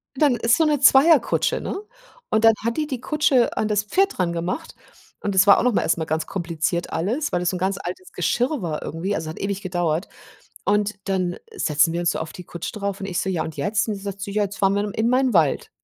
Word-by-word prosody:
Dann 275 -2 +3
ist 230 +1 +2
so 320 - +3
'ne 300 -2 +2
Zweierkutsche, 280 +3 +4
ne? - - -4 0.5
Und 220 - +1
dann 225 0 +7
hat 230 0 -1
die 305 -1 -1
die 260 -4 -4
Kutsche 290 -5 +2
an 215 - +1
das 205 -1 +1
Pferd 390 - 0
rangemacht 175 - -2 0.5
und 205 - -2
es 190 +3 +5
war 200 - +8
auch - - +1
noch 250 -2 +2
mal - - +2
erst 165 - +1
mal 160 - -2
ganz 160 +1 -1
kompliziert 170 -2 -2
alles, 225 - -1
weil 175 - 0
es 180 +1 0
'n - - -2
ganz 190 +2 0
altes 180 +1 -7
Geschirr 245 - 0
war 155 -3 -3
irgendwie, 185 +6 -3
also, 160 -1 -4
hat 160 - -8
ewig 200 0 -3
gedauert. 175 -1 -1 0.6
Und 205 +1 +1
dann 185 -2 -1 0.2
setzen 155 - +2
wir 170 - -2
uns 170 -1 +2
so - - -3
auf 160 - -5
die 180 - -10
Kutsche 170 0 -6
drauf 200 -2 -4
und 195 - -4
ich 185 -3 -2
so: - - -3
„Ja 180 -4 0
und 160 - -7
jetzt?“ 210 +2 0
Und 215 - -1
sie 195 - -9
sagt 200 -1 -6
so: 195 - -5
„Ja, 210 +1 +1
jetzt 200 +2 -7
fahren 195 -1 +3
wir 205 - +1
dann 205 -1 -4
in 220 +1 +1
mein 255 +1 +2
Wald.“ 160 -7 +2
200 Hz, 255 wpm, -22 LUFS, 175-230 Hz, 0.6 s, war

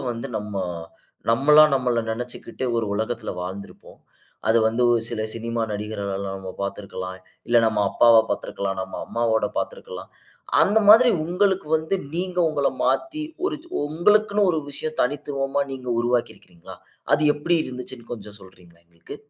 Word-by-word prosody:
வந்து 120 +3 -5
நம்ம, 105 0 -7 0.8
நம்மளா 150 +6 +7
நம்மள 125 -2 +1
நம்ம - - -2
நினைச்சுகிட்டு 125 +2 -6
ஒரு 115 - -1
உலகத்தில 110 +2 -3
வாழ்ந்திருப்போம். 95 +2 -9 0.5
அது 115 - +5
வந்து 115 +2 0
ஒ - - +4
சில 110 -2 -3
சினிமா 115 0 -3
நடிகர்கள்லாம் 100 -2 -4
நம்ம 95 -1 -7
பாத்திருக்கலாம். 100 -2 -5 0.3
இல்ல 120 - +3
நம்ம 110 -1 +1
அப்பாவ 115 -1 +6
பாத்திருக்கலாம். 100 -1 -3
நம்ம 95 - -7
அம்மாவோட 115 -1 +1
பாத்திருக்கலாம். - - -5 0.5
அந்த 205 +6 +4
மாதிரி 235 +4 +8
உங்களுக்கு 185 +1 +1
வந்து, 160 +4 -2 0.2
நீங்க 180 +1 -3
உங்கள 145 -3 +1
மாத்தி 310 -2 0 0.2
ஒரு 315 - -2 0.2
ஓ - - 0
உங்களுக்குன்னு 205 +4 +3
ஒரு 160 - 0
விஷயம் 155 +2 -5
தனித்துவமா 135 +1 -1
நீங்க 130 -2 -7
உருவாக்கி 120 0 0
இருக்கீங்களா? 85 -2 -14 0.4
அது 150 - +1
எப்டி 170 +4 +1
இருந்ததுச்சுன்னு 125 -2 -8
கொஞ்சம் 105 -3 -9
சொல்றீங்களா? 90 -3 -18
எங்களுக்கு. 85 +10 -11
120 Hz, 145 wpm, -23 LUFS, 105-155 Hz, 0.8 s, மாதிரி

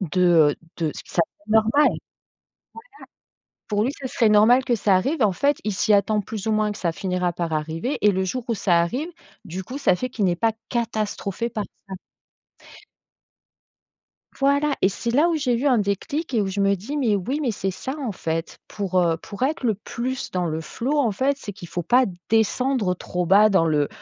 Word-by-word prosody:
de, 175 -3 +4
heu, - - -5 0.2
de 160 -2 0
ça 170 - +1
serait 205 - -34 0.2
normal. 220 - -1
Voilà, 295 +1 +4 1.7
pour 210 0 +1
lui, 265 - 0
ce 265 - -4
serait 230 -2 +2
normal 220 +5 +5
que 245 -3 +1
ça 200 -3 +3
arrive 275 - -1
et 220 - +5
en 200 - +3
fait, 280 +10 +1
il 210 - -1
s'y 210 +3 +1
attend 205 +1 +3
plus 205 0 -6
ou - - +2
moins 215 -1 +1
que 205 - -9
ça 170 - 0
finira 180 -1 -1
par 170 -1 -3
arriver 160 - -2
et 210 - +5
le 190 -1 0
jour 250 +6 -3
où 230 - +1
ça 180 -4 +2
arrive, 250 - -2 0.4
du 190 0 -6
coup, 255 +8 -7
ça 275 -10 +3
fait 255 +8 -3
qu'il 215 -5 -2
n'est 175 -2 +2
pas 225 +3 +1 0.2
catastrophé 225 -2 -2
par 215 -2 -4 0.2
ça. 190 - -6 2.4
Voilà 280 +1 +2
et 190 - +5
c'est 235 +4 -3
là 295 +8 +3
où - - 0
j'ai 255 -5 0
eu 275 - -1
un 255 -4 +4
déclic 230 - -2
et 220 - +3
où - - -2
je 200 +1 -3
me 200 0 +3
dis: 215 +11 -6
«Mais 225 -7 +2
oui, 255 +10 -2
mais 270 -5 0
c'est 195 -2 -2
ça, 225 +8 -5
en 250 -7 -3
fait, 165 -1 -4
pour, 190 -3 -1
heu, 170 -2 +2
pour 200 +7 -10
être 280 0 0
le 220 -3 +2
plus 245 +5 -5
dans 180 -1 -1
le 160 0 -2
flow 260 - -2
en 245 -6 +2
fait, 265 +7 0
c'est 205 - -7
qu'il 185 -3 -10
faut 175 +1 -3
pas 250 +9 +4 0.2
descendre 225 -1 +1
trop 180 0 -3
bas 205 +4 +6
dans 190 -5 +3
le 150 -2 +1
210 Hz, 215 wpm, -23 LUFS, 185-250 Hz, 2.4 s, bas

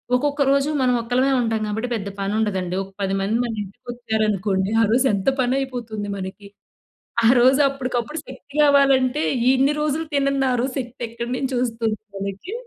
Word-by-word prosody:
ఒక్కొక్క 285 +2 0
రోజు 280 +1 +2
మనం 250 -1 +3
ఒక్కళమే 250 +4 +1
ఉంటాం 225 -2 -1
కాబట్టి 220 +4 -2
పెద్ద 200 -3 -3
పని 195 +1 -1
ఉండదండి. 190 -4 -1
ఒక 195 - -13
10 195 0 0
మంది 215 +4 0
మన 235 -2 -3
ఇంటికొచ్చారనుకోండి. 215 -3 -2
ఆ - - +5
రోజు 255 +3 +3
ఎంత 200 +6 +1
పని 255 +1 +2
అయిపోతుంది 230 -6 -4
మనకి. 190 +2 -7 0.8
ఆ - - +7
రోజు 260 +3 +5
అప్పడికప్పుడు 260 +2 -3
శక్తి 285 -1 -13
గావాలంటే 275 -1 +4 0.3
ఇన్ని 270 +3 +3
రోజులు 305 +2 -1
తినన్నారు 270 -3 +1
శక్తి 245 -1 -6
ఎక్కడి 235 +1 -5
నుంచి 265 -1 -2
వస్తుంది 230 -2 -1 0.2
మనకి! 195 - -5
240 Hz, 155 wpm, -22 LUFS, 210-270 Hz, 0.8 s, ఆ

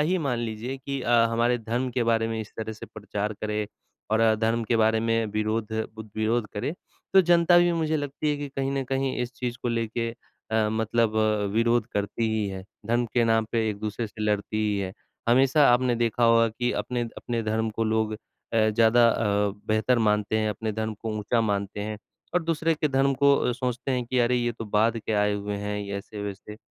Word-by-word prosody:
ही 180 +5 +2
मान 125 -4 0
लीजिए 115 +3 -4
कि 140 0 -4
अ, 120 - -2 0.2
हमारे 120 +1 +2
धर्म 120 +3 -2
के 125 0 0
बारे 115 -1 +2
में 110 -1 -2
इस 110 - -8
तरह 110 0 -3
से 110 - -10
प्रचार 105 0 -4
करें 105 0 -1 0.4
और 110 +1 +3
अधर्म 115 +1 +2
के 115 +1 +1
बारे 110 0 +3
में 115 0 +1
विरोध 110 +1 -1 0.2
बु 110 - -6
विरोध 110 +1 +1
करें। 105 +8 -2 0.4
तो 190 - +9
जनता 175 0 +5
भी 175 0 +4
मुझे 160 -2 0
लगती 145 +1 -2
है 145 - 0
कि 145 0 -5
कहीं 135 0 0
न 135 -1 -1
कहीं 135 0 -1
इस 125 +1 -5
चीज़ 120 -1 -3
को 120 - -1
लेके 115 0 -1
अ, 110 -1 -3
मतलब 110 0 +1 0.4
विरोध 115 0 +2
करती 105 +3 -1
ही 110 -2 0
है। 95 -1 -6 0.2
धर्म 120 +1 +1
के 120 -2 +4
नाम 115 -1 +3
पे 115 -2 +1
एक-दूसरे 105 +2 -4
से 110 +1 -8
लड़ती 105 0 -1
ही 105 -1 0
है। 95 -1 -3 0.4
हमेशा 135 +4 +5
आपने 125 0 +2
देखा 120 0 +1
होगा 115 0 +5
कि 120 +2 -2
अपने 125 -1 -2 0.2
अपने 120 -2 -3
धर्म 110 +1 0
को 115 +1 -2
लोग 110 0 +1
अ, 105 - -9 0.5
ज़्यादा 115 +2 +5
अ, 105 -2 +1 0.2
बेहतर 110 +3 +2
मानते 105 +1 0
हैं, 110 0 +1
अपने 110 +1 -3
धर्म 110 +1 -3
को 115 - -3
ऊँचा 115 +3 +1
मानते 100 -1 -2
हैं। 105 0 -4 0.4
और 180 - +2
दूसरे 165 0 +1
के 155 0 0
धर्म 135 0 +2
को 140 +1 +5
अ, 125 - +1
सोचते 125 +1 -3
हैं 125 -1 -1
कि 125 +1 0
अरे 120 +1 +3
ये 120 -1 0
तो 115 - -7
बाद 110 +2 +2
के 110 0 -4
आए 105 0 +2
हुए 100 0 -3
हैं 105 0 -3
ये 100 -1 -4
ऐसे-वैसे, 105 0 -7
115 Hz, 210 wpm, -26 LUFS, 110-125 Hz, 0.5 s, तो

